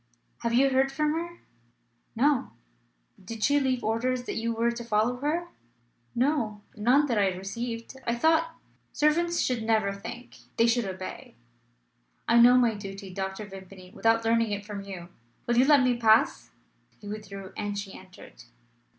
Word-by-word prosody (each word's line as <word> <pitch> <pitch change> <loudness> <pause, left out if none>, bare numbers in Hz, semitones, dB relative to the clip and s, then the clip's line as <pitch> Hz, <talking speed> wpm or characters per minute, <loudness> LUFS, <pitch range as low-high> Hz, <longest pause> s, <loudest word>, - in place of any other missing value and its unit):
"Have 235 - -1
you 270 +2 +4
heard 265 +1 +2
from 300 +2 0
her?" 340 +1 -4 0.8
"No." 270 +2 +1 0.7
"Did 220 +3 -6
she 290 0 +4
leave 260 -3 0
orders 245 +3 0
that - - -4
you 230 +1 -2
were 230 +1 +1
to 235 0 -6
follow 230 +2 +1
her?" 320 +6 -2 0.7
"No; 235 -6 0
none 250 +7 +3
that 235 -6 0
I 200 - +3
received. 230 +6 -5
I 235 - +1
thought 325 +5 +2 0.2
" - - -40
"Servants 340 +3 +2
should 250 -3 0
never 220 -3 +1
think. 240 +5 -9 0.2
They 230 - +5
should 235 -1 +2
obey." 185 -9 -7 0.9
"I 235 - +5
know 245 +1 +8
my 240 -3 +3
duty, 195 -2 -8
Dr. 190 +2 -4
Vimpany, 190 -2 -12
without 225 -1 +2
learning 230 0 +2
it 205 0 -4
from 205 -1 -6
you. 185 -3 -8 0.4
Will 240 0 0
you 255 - +6
let 285 -2 +6
me 250 -1 +2
pass?" 225 -1 +3 0.5
He 205 - -11
withdrew, 200 -2 -8
and 205 -1 -3
she 200 -1 -6
entered. 185 -9 -14
230 Hz, 165 wpm, -27 LUFS, 205-255 Hz, 0.9 s, know